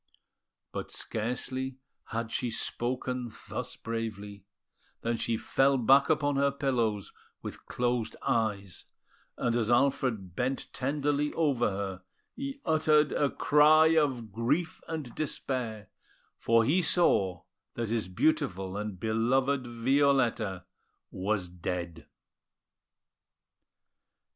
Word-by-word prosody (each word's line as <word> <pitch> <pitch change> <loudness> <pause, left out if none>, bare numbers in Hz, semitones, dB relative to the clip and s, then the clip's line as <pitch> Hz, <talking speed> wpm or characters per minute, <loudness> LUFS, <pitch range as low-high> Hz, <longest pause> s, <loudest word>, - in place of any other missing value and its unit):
But - - -5
scarcely 130 +3 -3 0.3
had 115 0 -4
she 125 - -1
spoken 125 +1 -2 0.2
thus - - -4
bravely, 105 -3 -5 0.6
than 115 0 0
she 115 0 -1
fell 135 +4 +2
back 135 +3 +5
upon 145 -2 +2
her 140 0 +4
pillows 120 -7 -1 0.3
with - - -8
closed 120 -2 -1
eyes; 100 -4 -1 0.5
and 120 -1 0
as 115 -2 +1
Alfred 120 -7 +1
bent 130 +4 -2
tenderly 145 +2 0
over 140 -8 +2
her, 95 -2 -4 0.3
he 275 +2 -6
uttered 155 -2 +3
a 145 - +2
cry 155 +3 +5
of 130 -8 +1
grief 135 - -1
and 155 -7 -5
despair, 120 - -3 0.5
for 115 0 +3
he 170 +9 +3
saw 95 - +2 0.3
that 115 -2 -2
his 115 -4 -1
beautiful 95 - 0
and 105 -3 -4
beloved 125 +5 +1
Violetta 120 -6 +1 0.5
was 95 0 -1
dead! 85 -1 -5
120 Hz, 105 wpm, -29 LUFS, 110-140 Hz, 0.6 s, back